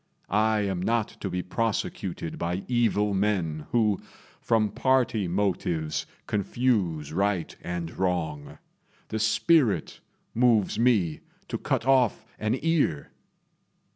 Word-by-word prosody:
I 110 +1 +3
am 95 -3 -1
not 115 +2 +1
to 100 - -2
be 90 0 -2
prosecuted 95 -5 -3
by 90 +3 -2
evil 110 -4 +2
men 95 -7 0
who, 110 -4 +2 0.4
from 110 -2 +2
party 120 -5 +1
motives, 85 -4 -1 0.2
confuse 100 - 0
right 95 -2 0
and 85 -1 -4
wrong. 80 -6 -2 0.5
The 110 - -2
spirit 110 - +2 0.3
moves 115 -5 +3
me 105 -10 +2 0.3
to - - -3
cut - - -1
off 130 -4 +3
an 110 +4 0
ear." 155 - +1
100 Hz, 110 wpm, -27 LUFS, 90-115 Hz, 0.5 s, I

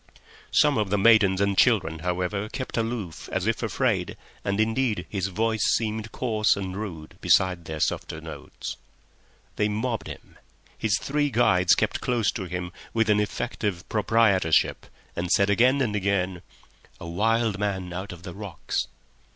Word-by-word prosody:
Some 145 -5 +4
of 105 -2 0
the 105 - +1
maidens 100 -3 +5
and 100 0 +2
children, 95 -9 +3
however, 90 +4 -2
kept 130 +2 -5
aloof 115 -7 -3
as - - -1
if - - 0
afraid, - - 0 0.3
and 100 +1 -1
indeed 110 -3 +1
his 100 -2 -1
voice 110 +3 -1
seemed 110 -1 -2
coarse 110 -4 +1
and 95 -2 -4
rude 90 -7 -7
beside 90 -3 +3
their 80 -1 -5
softer 80 - -1
notes. 80 -2 -8 0.8
They 105 0 +2
mobbed 110 0 -2
him. - - -11 0.4
His 105 -4 +1
three 145 +1 0
guides 90 -8 +4
kept - - -1
close 120 -4 +1
to 95 - -5
him 90 0 -4 0.2
with 115 -1 +3
an 105 - +4
effect 105 +2 -3
of 90 -5 -2
proprietorship, 105 -6 +2 0.3
and 90 +1 -2
said 100 0 +4
again 125 +6 +4
and 110 -5 0
again, 95 -3 0 0.6
"A - - -8
wild 110 +4 +1
man 95 -3 -2
out 95 +3 -5
of 90 -1 -11
the 90 -2 -7
rocks." 100 -3 -4
100 Hz, 160 wpm, -26 LUFS, 90-110 Hz, 0.8 s, maidens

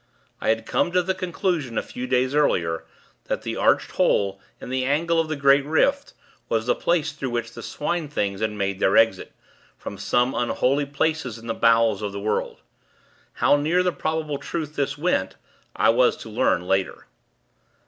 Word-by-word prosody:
I - - 0
had 110 0 +1
come 175 - 0
to 180 0 +3
the 190 +2 0
conclusion 175 - -2
a - - 0
few 125 +1 -6
days 130 +1 +1
earlier, 85 - +1 0.4
that - - -3
the - - -3
arched - - +2
hole, 100 -1 +1 0.2
in - - -9
the 130 0 0
angle 165 +5 +1
of 160 -1 0
the 155 - -1
great 140 0 +4
rift, 155 +2 +1 0.3
was 110 -1 0
the 125 - +3
place 160 -3 0
through 140 -3 -5
which 120 -1 -3
the 120 - -8
Swine 155 +6 -3
things 100 -8 -2
had 110 - +1
made 100 -2 -3
their 95 - +3
exit, 115 -4 +3 0.5
from 100 - -8
some 120 +5 +1
unholy 135 +4 0
place 160 +3 0
in 115 - -13
the 115 - -2
bowels 115 -3 +3
of 105 -1 -4
the 100 - -4
world. 105 +2 -2 0.7
How 145 - +3
near 165 +5 +1
the 180 - +1
probable 155 -3 -3
truth 155 -3 -5
this 140 0 -1
went, 145 - 0 0.4
I - - +3
was - - +3
to - - -10
learn 90 - +1
later. 95 +1 -1
130 Hz, 185 wpm, -23 LUFS, 110-155 Hz, 0.7 s, great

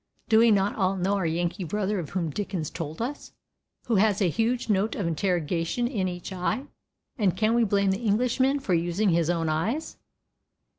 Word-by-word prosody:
Do 220 -1 +6
we 230 +1 +6
not 200 -1 +2
all 190 -1 +1
know 190 +2 0
our 185 -4 0
Yankee 175 +4 -1
brother 205 +3 -1
of 160 - -5
whom 170 -4 -2
Dickens 185 -4 -3
told 160 +5 -5
us, 285 +4 -6 0.5
who 230 -4 +1
has 205 0 +3
a 190 -4 +2
huge 230 +6 0
note 210 +1 +1
of 200 - -2
interrogation 170 +5 0
in 205 -7 -1
each 180 +1 -6
eye, 185 +9 -2 0.5
and 190 -4 +2
can 215 +2 +2
we 235 0 +3
blame 200 -2 +2
the 195 +4 -2
Englishman 250 +5 +2
for 205 -9 -1
using 175 +5 +1
his 170 -1 +2
own 165 -2 0
eyes? 195 - -2
195 Hz, 190 wpm, -26 LUFS, 175-220 Hz, 0.5 s, Do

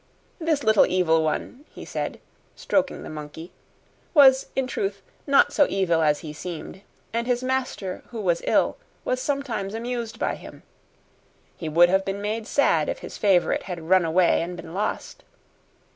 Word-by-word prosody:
This 320 -4 0
little 220 -1 +5
evil 170 -3 +2
one, 200 - -3
he - - -8
said, - - -4 0.4
stroking 280 -1 -1
the - - -8
monkey, 155 +2 -8 0.6
was, 265 -3 +7
in 265 - +1
truth, 195 -5 -3 0.2
not 280 +1 +4
so 290 - +4
evil 175 -4 +1
as 150 -2 +2
he 155 -2 -7
seemed, 175 +3 -7 0.3
and 235 +1 -1
his 245 0 0
master, 255 -8 -2
who 235 - -7
was 175 -5 0
ill, - - +2 0.3
was 255 0 -1
sometimes 255 -9 -2
amused 235 -1 -4
by - - -1
him. - - -11 0.9
He 160 - -5
would 170 +3 +5
have 190 +1 +2
been 195 +1 -3
made 215 +2 -3
sad 285 - +2
if - - -2
his - - -9
favorite 190 -4 +3
had 170 -3 -7
run 185 -1 +5
away 170 +2 +3
and 175 +1 -5
been 165 -1 -9
lost. 205 +3 -3
195 Hz, 165 wpm, -24 LUFS, 175-255 Hz, 0.9 s, was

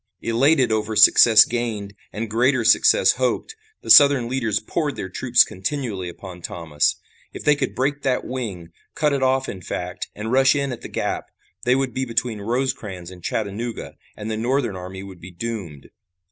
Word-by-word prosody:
Elated 130 +3 +2
over 110 0 -1
success 110 +1 +7
gained 115 -4 -4 0.2
and 110 +2 -4
greater 120 +2 +1
success 305 - +5
hoped, 445 - -1 0.3
the - - 0
Southern 140 -4 +7
leaders 115 -5 -1
poured 145 +5 -3
their 95 - -6
troops 120 +5 +3
continually 100 -2 -4
upon 90 0 -11
Thomas. 80 -4 -1 0.4
If - - -8
they 150 - +4
could - - -3
break 140 +3 -1
that 130 -2 -1
wing, 105 -10 -6 0.3
cut 150 -1 +1
it 140 - -1
off 130 0 +1
in 95 - -7
fact, 90 +1 -5
and 110 +2 -5
rush 135 +2 +4
in 140 -1 -1
at 120 - -7
the - - -7
gap, - - -3 0.4
they 125 +1 +3
would 135 -2 -1
be 130 +2 -2
between 115 -2 -2
Rosecrans 110 -6 -3
and 90 -2 -14
Chattanooga 110 +5 -4 0.2
and 105 +1 -5
the 110 - -3
Northern 120 -2 -1
army 95 +1 -8
would 95 -3 -12
be 90 - -10
doomed. 90 -7 -7
115 Hz, 175 wpm, -22 LUFS, 100-130 Hz, 0.4 s, success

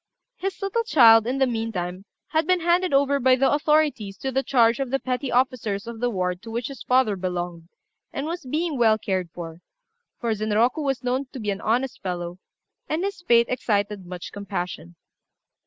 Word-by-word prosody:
His 390 0 -4
little 395 +4 0
child, 230 - +6
in 260 +2 -1
the 270 - +4
meantime, 200 -6 -3 0.2
had 315 0 +1
been 365 -1 +3
handed 350 +2 +2
over 280 0 +3
by 260 0 +5
the 270 +1 +2
authorities 295 -9 +1
to 265 - -3
the 265 +1 +1
charge 235 -3 +3
of 270 -2 -2
the 270 - +1
petty 255 0 -3
officers 240 -5 0
of 230 -1 -7
the 245 +1 +1
ward 180 -4 -2
to 230 - -10
which 235 +2 -3
his 275 - -9
father 250 -5 +2
belonged, 175 -2 -4 0.4
and 275 - -4
was 340 +2 -4
being 300 +2 -2
well 220 -2 +5
cared 190 -4 -2
for; 165 0 -9 0.6
for 230 -2 0
Zenroku 215 +7 +1
was 270 -3 -1
known 255 +2 0
to 265 - -6
be 210 -2 -1
an 195 - -5
honest 245 +4 -1
fellow, 175 -1 -4 0.5
and 315 +4 -1
his 400 -2 -3
fate 235 -8 +4
excited 205 -5 -1
much 180 -1 -7
compassion. 180 - -5
235 Hz, 190 wpm, -24 LUFS, 200-275 Hz, 0.6 s, child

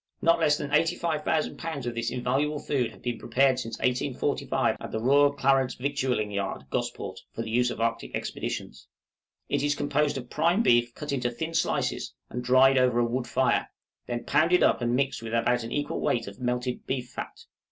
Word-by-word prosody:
Not 165 0 +3
less 150 -2 +3
than 145 0 -5
85,000 160 -1 +1
lbs. 160 -6 -4
of 120 - -2
this 115 0 -2
invaluable 135 +5 0
food 135 -4 -1
have - - -17
been 120 -2 -2
prepared 130 -1 +2
since 115 -2 -5
1845 125 0 0
at - - -7
the 110 - -2
Royal 140 +4 +4
Clarence 135 -2 +2
Victualing 130 -5 -1
Yard, 100 -1 -3
Gosport, - - -3
for - - -3
the 110 - -6
use 125 +1 +2
of - - -5
the 115 - -1
Arctic 115 0 -2
Expeditions. - - -5 0.6
It - - 0
is 145 0 +1
composed 145 0 0
of 125 -2 -8
prime 170 +8 +2
beef 120 - +3
cut 150 -1 -5
into 125 -3 0
thin 160 +7 -5
slices 165 - -1 0.2
and 125 - -4
dried 130 +2 +5
over 125 -2 +3
a 120 - +3
wood 120 +1 -2
fire; 130 -2 +1 0.4
then 120 -1 -3
pounded 165 +5 +3
up - - +3
and 120 0 +1
mixed 135 -1 0
with 115 0 -4
about 120 +1 +2
an 115 - -6
equal 145 0 -2
weight 115 -2 +1
of 100 0 -10
melted 125 0 -2
beef 125 -2 -3
fat. - - -7
130 Hz, 195 wpm, -27 LUFS, 120-145 Hz, 0.6 s, dried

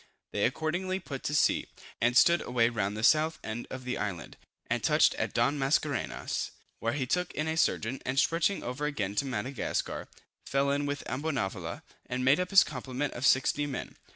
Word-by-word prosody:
They 100 - +1
accordingly 175 +8 -1
put 140 -7 -7
to 150 - 0
sea, - - +3 0.3
and 120 +2 +3
stood 170 +4 +6
away 120 -1 +2
round 105 -3 -2
the 110 - -4
south 155 +5 +4
end 110 +2 -5
of 130 -1 -7
the 125 0 -3
island, 90 -6 -4 0.3
and - - -1
touched - - +4
at - - -2
Don 145 +1 +1
Mascarenhas, 140 -1 -1 0.3
where 115 - -1
he 140 -3 -1
took 180 +7 0
in 155 +1 -1
a 160 - 0
surgeon, 130 -5 0
and 130 +1 -2
stretching 165 +6 +2
over 130 +5 -2
again 105 -10 -2
to 140 - +2
Madagascar, 130 0 -3 0.4
fell 140 0 +1
in 145 +1 0
with 145 0 -3
Ambonavoula, 135 -7 -3 0.2
and 125 +1 -2
made 140 +5 +5
up 180 0 -1
his 195 -1 +8
complement 135 0 -4
of 125 +2 +1
60 140 +3 +3
men. 135 - -5
135 Hz, 185 wpm, -30 LUFS, 125-150 Hz, 0.4 s, his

